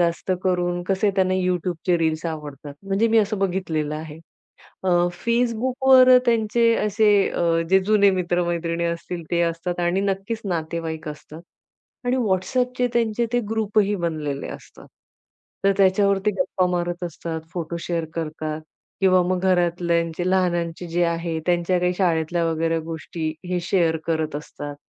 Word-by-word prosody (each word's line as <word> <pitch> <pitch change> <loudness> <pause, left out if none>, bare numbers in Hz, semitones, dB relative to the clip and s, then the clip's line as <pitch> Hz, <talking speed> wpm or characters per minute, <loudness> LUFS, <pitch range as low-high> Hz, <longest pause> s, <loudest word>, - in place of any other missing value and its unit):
जास्त 170 +2 0
करून 175 -1 0
कसे, 200 +2 +2
त्यांना 185 0 +2
YouTubeचे 180 -1 0
रील्स 160 +1 0
आवडतात. 145 -2 -8 0.2
म्हणजे 215 +4 +2
मी - - +7
असं 210 -1 +1
बघितलेलं 170 -6 -1
आहे. 155 0 -7 0.7
अ, - - +1 0.4
Facebookवर 255 +2 +5
त्यांचे 230 0 +3
असे 210 +1 +2 0.2
अ, - - -2 0.3
जे 190 0 +6
जुने 200 -2 +5
मित्र-मैत्रिणी 170 -1 -1
असतील, 170 +1 -3
ते 170 0 +1
असतात 175 +1 -4
आणि 180 +3 +1
नक्कीच 195 +4 -3
नातेवाईक 160 -3 -3
असतात. 150 +2 -10 0.6
आणि 250 +1 +1
WhatsAppचे 250 +4 0
त्यांचे 235 0 +1
ते 245 - +2
ग्रुपही 210 -1 +1
बनलेले 150 -4 -3
असतात. - - -17 0.8
तर 195 - +5
त्याच्यावरती 200 +1 +3
गप्पा 185 -8 +1
मारत 175 +1 -3
असतात, 165 -1 -5
फोटो 170 -1 -4
शेअर 170 -2 -2
करतात, 155 -1 -4 0.4
किंवा 185 -2 +5
मग 180 0 0
घरातल्यांचे 175 -1 +1
लहानांचे 175 -2 0
जे 175 +1 +2
आहे, 165 -1 -1
त्यांच्या 175 +1 +2
काही 180 0 +1
शाळेतल्या 170 -2 +1
वगैरे 165 0 0
गोष्टी 160 0 -5 0.2
हे 180 -1 0
शेअर 170 -3 +2
करत 160 -2 -1
असतात. 145 -1 -7
175 Hz, 135 wpm, -23 LUFS, 165-195 Hz, 0.8 s, मी